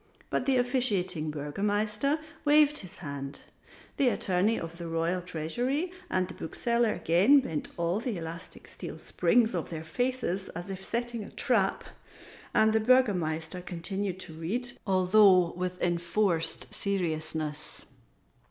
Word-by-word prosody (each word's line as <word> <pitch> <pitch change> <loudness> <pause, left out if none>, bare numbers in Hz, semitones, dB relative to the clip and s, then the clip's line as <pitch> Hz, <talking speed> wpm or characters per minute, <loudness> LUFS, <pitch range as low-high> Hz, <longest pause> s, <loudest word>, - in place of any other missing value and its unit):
But 255 - 0
the 265 -1 +4
officiating 200 - +1
Burgomaster 205 - 0 0.3
waved 295 0 +5
his 185 -3 -10
hand, 140 0 -6 0.6
the 275 - +3
Attorney 200 +1 +1
of 165 +1 -7
the 170 - -5
Royal 165 +2 0
Treasury 240 - -2 0.2
and 185 -1 +1
the 185 - -8
Bookseller 235 +6 0
again 195 - +5
bent 160 - -3
all 170 +3 0
the 230 -4 -3
elastic 165 +1 -8
steel - - -8
springs 235 -3 +2
of 170 -3 -2
their 160 -2 -5
faces 230 0 -2
as 175 +3 -5
if 190 0 -6
setting 235 0 -3
a - - -9
trap, 225 -8 +1 0.7
and 220 0 +4
the 220 - +4
Burgomaster 180 -9 +2
continued 185 +2 -3
to 160 - -8
read, 215 +11 -3 0.2
although 185 -1 +5
with 180 0 -3
enforced 170 -1 0
seriousness. 155 -5 -3
185 Hz, 135 wpm, -29 LUFS, 165-230 Hz, 0.7 s, waved